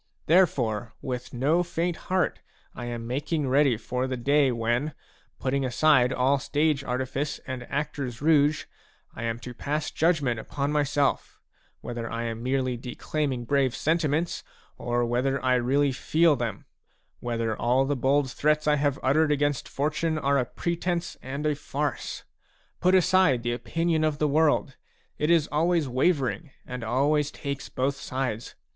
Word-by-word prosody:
Therefore 125 Hz, -, +2 dB
with 125 Hz, -3 st, -4 dB
no 145 Hz, +8 st, +2 dB
faint 175 Hz, 0 st, -1 dB
heart 185 Hz, -1 st, +1 dB, 0.3 s
I 120 Hz, -, -7 dB
am 120 Hz, -1 st, -5 dB
making 145 Hz, +4 st, -1 dB
ready 135 Hz, -2 st, +3 dB
for 125 Hz, +3 st, -2 dB
the 130 Hz, -1 st, -3 dB
day 140 Hz, +2 st, +3 dB
when, 120 Hz, +5 st, -1 dB, 0.4 s
putting 135 Hz, +1 st, -1 dB
aside 130 Hz, 0 st, +4 dB
all 130 Hz, +2 st, +2 dB
stage 145 Hz, 0 st, +1 dB
artifice 130 Hz, +3 st, -2 dB
and 130 Hz, -2 st, -6 dB
actor's 140 Hz, -4 st, -3 dB
rouge, 150 Hz, -1 st, +3 dB, 0.5 s
I -, -, -8 dB
am 115 Hz, 0 st, -1 dB
to 125 Hz, +1 st, -7 dB
pass 145 Hz, +4 st, -3 dB
judgment 150 Hz, -8 st, +1 dB
upon 140 Hz, +5 st, -3 dB
myself, 145 Hz, -1 st, 0 dB, 0.2 s
— -, -, -39 dB
whether 115 Hz, -1 st, -5 dB
I 115 Hz, 0 st, -3 dB
am 115 Hz, -1 st, -4 dB
merely 130 Hz, 0 st, 0 dB
declaiming 130 Hz, +1 st, -3 dB
brave 135 Hz, -1 st, +1 dB
sentiments, 160 Hz, +1 st, 0 dB, 0.3 s
or 120 Hz, 0 st, -1 dB
whether 130 Hz, +3 st, 0 dB
I 130 Hz, -, +4 dB
really 135 Hz, +3 st, +2 dB
feel 155 Hz, +4 st, +3 dB
them; 115 Hz, -5 st, -4 dB, 0.5 s
whether 115 Hz, -2 st, -2 dB
all 125 Hz, +3 st, +2 dB
the 145 Hz, +1 st, 0 dB
bold 135 Hz, +1 st, +1 dB
threats 150 Hz, +2 st, +1 dB
I 150 Hz, 0 st, +3 dB
have 140 Hz, -1 st, +1 dB
uttered 150 Hz, +4 st, +3 dB
against 145 Hz, -1 st, 0 dB
fortune 155 Hz, +3 st, -1 dB
are 140 Hz, -2 st, +2 dB
a 125 Hz, -, 0 dB
pretence 170 Hz, +3 st, -2 dB
and 140 Hz, +3 st, -5 dB
a 150 Hz, -, +2 dB
farce. 145 Hz, 0 st, -4 dB, 0.6 s
Put 185 Hz, +1 st, +4 dB
aside 185 Hz, -9 st, +4 dB
the 120 Hz, 0 st, 0 dB
opinion 165 Hz, +5 st, 0 dB
of 155 Hz, -2 st, +1 dB
the 150 Hz, -, +1 dB
world; 145 Hz, -2 st, +2 dB, 0.4 s
it 150 Hz, -, +1 dB
is 165 Hz, -3 st, +4 dB
always 165 Hz, 0 st, +2 dB
wavering 135 Hz, +2 st, 0 dB, 0.2 s
and 125 Hz, -2 st, -6 dB
always 140 Hz, +5 st, +1 dB
takes 140 Hz, -2 st, -5 dB
both 135 Hz, +2 st, -1 dB
sides. 130 Hz, -4 st, -4 dB
140 Hz, 155 wpm, -26 LUFS, 125-150 Hz, 0.6 s, aside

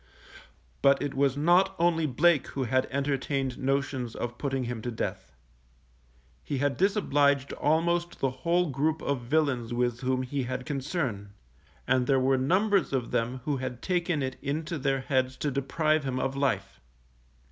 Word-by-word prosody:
But 140 Hz, 0 st, +5 dB
it 145 Hz, -, -3 dB
was 135 Hz, 0 st, +1 dB
not 175 Hz, +5 st, +4 dB
only 165 Hz, -2 st, +2 dB
Blake 150 Hz, +3 st, +3 dB
who 135 Hz, -, -3 dB
had 130 Hz, +2 st, +1 dB
entertained 135 Hz, -1 st, -1 dB
notions 135 Hz, -3 st, -1 dB
of 120 Hz, 0 st, -5 dB
putting 135 Hz, -2 st, -1 dB
him 120 Hz, -2 st, -4 dB
to 120 Hz, -, -4 dB
death. 115 Hz, -, -4 dB, 1.1 s
He 140 Hz, -, -3 dB
had 145 Hz, +1 st, +1 dB
disobliged 145 Hz, -9 st, +2 dB
almost 170 Hz, +3 st, 0 dB
the 135 Hz, -, +1 dB
whole 170 Hz, +5 st, 0 dB
group 150 Hz, +4 st, 0 dB
of 140 Hz, -3 st, -1 dB
villains 125 Hz, -3 st, 0 dB
with 120 Hz, -1 st, 0 dB
whom 130 Hz, 0 st, 0 dB
he 135 Hz, +2 st, -2 dB
had 125 Hz, 0 st, -4 dB
concern, 135 Hz, -, -3 dB, 0.5 s
and 125 Hz, 0 st, +2 dB
there 135 Hz, -1 st, +4 dB
were 130 Hz, 0 st, +2 dB
numbers 190 Hz, +6 st, +2 dB
of 125 Hz, -3 st, -1 dB
them 125 Hz, +3 st, -1 dB
who 145 Hz, -2 st, 0 dB
had 130 Hz, -2 st, -5 dB
taken 175 Hz, -5 st, 0 dB
it 130 Hz, 0 st, -4 dB
into 155 Hz, +3 st, -3 dB
their 135 Hz, 0 st, 0 dB
heads 130 Hz, -1 st, 0 dB
to 145 Hz, -, -1 dB
deprive 155 Hz, +3 st, +1 dB
him 130 Hz, -1 st, -2 dB
of 135 Hz, +1 st, -1 dB
life. 100 Hz, -9 st, -1 dB
135 Hz, 160 wpm, -28 LUFS, 130-155 Hz, 1.1 s, But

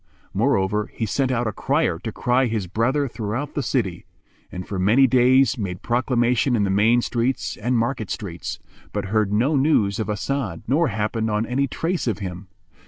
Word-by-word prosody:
Moreover, 105 Hz, -2 st, +1 dB
he 115 Hz, -, -4 dB
sent 130 Hz, +5 st, 0 dB
out 120 Hz, -1 st, 0 dB
a 110 Hz, -, 0 dB
crier 135 Hz, -, 0 dB
to 110 Hz, -, -5 dB
cry 125 Hz, +3 st, +1 dB
his 110 Hz, -4 st, -2 dB
brother 125 Hz, +10 st, 0 dB
throughout 115 Hz, +5 st, -4 dB
the 145 Hz, -, -1 dB
city, 110 Hz, -9 st, -2 dB, 0.4 s
and 90 Hz, 0 st, -6 dB
for 100 Hz, -, -4 dB
many 110 Hz, +9 st, +5 dB
days 130 Hz, 0 st, +4 dB
made 90 Hz, -4 st, -4 dB
proclamation 125 Hz, +1 st, +1 dB
in 105 Hz, -, +2 dB
the 100 Hz, -, +1 dB
main 115 Hz, +5 st, +3 dB
streets 115 Hz, -5 st, -1 dB
and 120 Hz, +3 st, 0 dB
market 115 Hz, -2 st, -1 dB
streets, 90 Hz, -6 st, -5 dB, 0.4 s
but -, -, -2 dB
heard 110 Hz, -2 st, +2 dB
no 125 Hz, +9 st, +2 dB
news 130 Hz, -8 st, +2 dB
of 110 Hz, -, -2 dB
As'ad 105 Hz, -3 st, -2 dB
nor 160 Hz, +5 st, +3 dB
happened 110 Hz, 0 st, -1 dB
on 105 Hz, +1 st, 0 dB
any 135 Hz, +4 st, 0 dB
trace 170 Hz, -1 st, -2 dB
of 115 Hz, -, 0 dB
him. 95 Hz, -1 st, -6 dB
115 Hz, 180 wpm, -23 LUFS, 105-130 Hz, 0.4 s, many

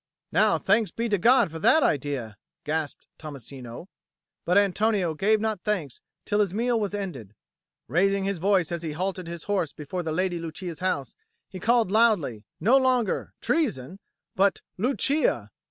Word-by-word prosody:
"Now -, -, +3 dB
thanks 210 Hz, +2 st, +2 dB
be 230 Hz, +1 st, -3 dB
to 205 Hz, -2 st, +1 dB
God 235 Hz, -3 st, +4 dB
for 165 Hz, -, -6 dB
that 315 Hz, -, +4 dB
idea!" 130 Hz, -6 st, -1 dB, 0.3 s
gasped 155 Hz, -1 st, -3 dB
Tommasino. 135 Hz, -2 st, -9 dB, 0.6 s
But 180 Hz, +3 st, +3 dB
Antonio 200 Hz, -3 st, +2 dB
gave 210 Hz, +7 st, +2 dB
not 215 Hz, -3 st, -2 dB
thanks 175 Hz, -, -3 dB, 0.2 s
till 205 Hz, 0 st, 0 dB
his 200 Hz, -3 st, +1 dB
meal 235 Hz, +1 st, +1 dB
was 205 Hz, -1 st, -2 dB
ended. 135 Hz, -, -6 dB, 0.5 s
Raising 195 Hz, +4 st, +2 dB
his 195 Hz, -2 st, -2 dB
voice 185 Hz, -2 st, +2 dB
as 170 Hz, -1 st, -3 dB
he 160 Hz, -3 st, -4 dB
halted 185 Hz, +1 st, -3 dB
his 170 Hz, -1 st, -6 dB
horse 185 Hz, -7 st, -1 dB
before 155 Hz, +5 st, -5 dB
the 160 Hz, -2 st, -3 dB
Lady 175 Hz, +1 st, -1 dB
Lucia's 165 Hz, +1 st, -6 dB
house, 180 Hz, -7 st, -2 dB, 0.3 s
he 185 Hz, -, -8 dB
called 230 Hz, 0 st, +2 dB
loudly, 195 Hz, -, +2 dB
no 245 Hz, +6 st, +5 dB
longer 255 Hz, -3 st, +1 dB
"Treason!" 195 Hz, -, -1 dB, 0.4 s
but 195 Hz, 0 st, +2 dB
"Lucia!" 245 Hz, -, 0 dB
185 Hz, 155 wpm, -26 LUFS, 155-210 Hz, 0.6 s, no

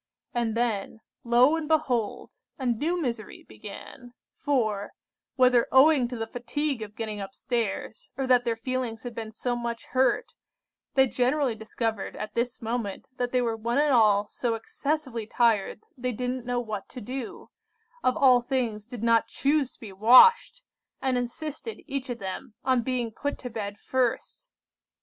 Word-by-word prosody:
And 230 Hz, -2 st, 0 dB
then, 220 Hz, -2 st, -1 dB, 0.2 s
lo 245 Hz, +5 st, +5 dB
and 320 Hz, -2 st, -3 dB
behold! 265 Hz, -9 st, 0 dB, 0.2 s
a 265 Hz, -, -5 dB
new 295 Hz, +9 st, 0 dB
misery 235 Hz, -8 st, -4 dB
began, 245 Hz, -2 st, -11 dB, 0.2 s
for, 215 Hz, -8 st, -1 dB, 0.4 s
whether 250 Hz, -2 st, +4 dB
owing 265 Hz, -1 st, +6 dB
to 245 Hz, 0 st, -6 dB
the 225 Hz, -, -2 dB
fatigue 245 Hz, +3 st, -3 dB
of 210 Hz, -1 st, -7 dB
getting 215 Hz, -2 st, -4 dB
up 195 Hz, +6 st, -7 dB
stairs, 230 Hz, -3 st, -3 dB
or 270 Hz, -, -1 dB
that 250 Hz, -1 st, +4 dB
their 235 Hz, -2 st, 0 dB
feelings 245 Hz, -2 st, -3 dB
had 245 Hz, -1 st, -6 dB
been 225 Hz, -1 st, -6 dB
so 245 Hz, +2 st, -2 dB
much 235 Hz, -1 st, -4 dB
hurt, 260 Hz, -, +2 dB, 0.6 s
they 265 Hz, -1 st, +6 dB
generally 255 Hz, +1 st, +1 dB
discovered 220 Hz, -1 st, -3 dB
at 210 Hz, 0 st, -6 dB
this 240 Hz, +1 st, -2 dB
moment 225 Hz, -3 st, -3 dB
that 245 Hz, -1 st, -1 dB
they 250 Hz, -1 st, +2 dB
were 230 Hz, -1 st, 0 dB
one 235 Hz, +3 st, -2 dB
and 295 Hz, -1 st, +3 dB
all 210 Hz, -3 st, +4 dB
so 235 Hz, -2 st, -2 dB
excessively 260 Hz, -1 st, -3 dB
tired, 220 Hz, -3 st, +1 dB
they 250 Hz, 0 st, -2 dB
didn't 250 Hz, +1 st, -3 dB
know 245 Hz, 0 st, 0 dB
what 215 Hz, -4 st, -5 dB
to 255 Hz, -, -8 dB
do;—of 255 Hz, -, -5 dB
all 255 Hz, -3 st, +6 dB
things, 235 Hz, -5 st, -2 dB
did 240 Hz, -2 st, -7 dB
not 230 Hz, -1 st, +4 dB
choose 280 Hz, +1 st, +1 dB
to -, -, -26 dB
be 210 Hz, -4 st, -9 dB
washed—and 260 Hz, -, +4 dB
insisted, 305 Hz, -, -4 dB
each 275 Hz, -2 st, -4 dB
of 245 Hz, -, -3 dB
them, 195 Hz, +1 st, -6 dB
on 255 Hz, -2 st, +3 dB
being 245 Hz, -1 st, -2 dB
put 285 Hz, +6 st, -3 dB
to 250 Hz, -, -7 dB
bed 205 Hz, -2 st, -5 dB
first! 260 Hz, -, -2 dB
245 Hz, 160 wpm, -27 LUFS, 225-260 Hz, 0.6 s, owing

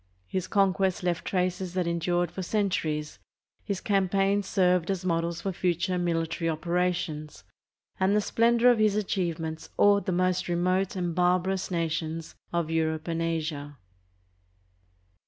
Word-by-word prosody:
His 185 Hz, -, -3 dB
conquests 190 Hz, -2 st, +1 dB
left 175 Hz, -1 st, -1 dB
traces 180 Hz, -1 st, -1 dB
that 180 Hz, -2 st, +1 dB
endured 170 Hz, 0 st, 0 dB
for 190 Hz, -, -5 dB
cen 200 Hz, +1 st, 0 dB
turies, 150 Hz, -3 st, -2 dB, 0.4 s
his 200 Hz, -2 st, -3 dB
campaigns 195 Hz, 0 st, +1 dB
served 180 Hz, -2 st, +2 dB
as 190 Hz, -2 st, -2 dB
models 170 Hz, -1 st, -1 dB
for 195 Hz, -, -2 dB
future 180 Hz, +1 st, 0 dB
military 165 Hz, -1 st, -1 dB
operations, 170 Hz, -2 st, -2 dB, 0.6 s
and 190 Hz, +2 st, +3 dB
the -, -, +4 dB
splendor 235 Hz, +3 st, +4 dB
of 235 Hz, -, +1 dB
his 215 Hz, -1 st, +3 dB
achievements 170 Hz, -6 st, -2 dB
awed 205 Hz, 0 st, +4 dB
the -, -, +1 dB
most 185 Hz, 0 st, +1 dB
remote 185 Hz, +2 st, +1 dB
and 175 Hz, -2 st, -2 dB
barbarous 180 Hz, +2 st, +1 dB
nations 165 Hz, -2 st, -2 dB, 0.2 s
of 170 Hz, -2 st, -1 dB
Europe 160 Hz, 0 st, 0 dB
and 165 Hz, 0 st, -1 dB
Asia. 155 Hz, -3 st, -3 dB
180 Hz, 135 wpm, -27 LUFS, 165-190 Hz, 0.6 s, the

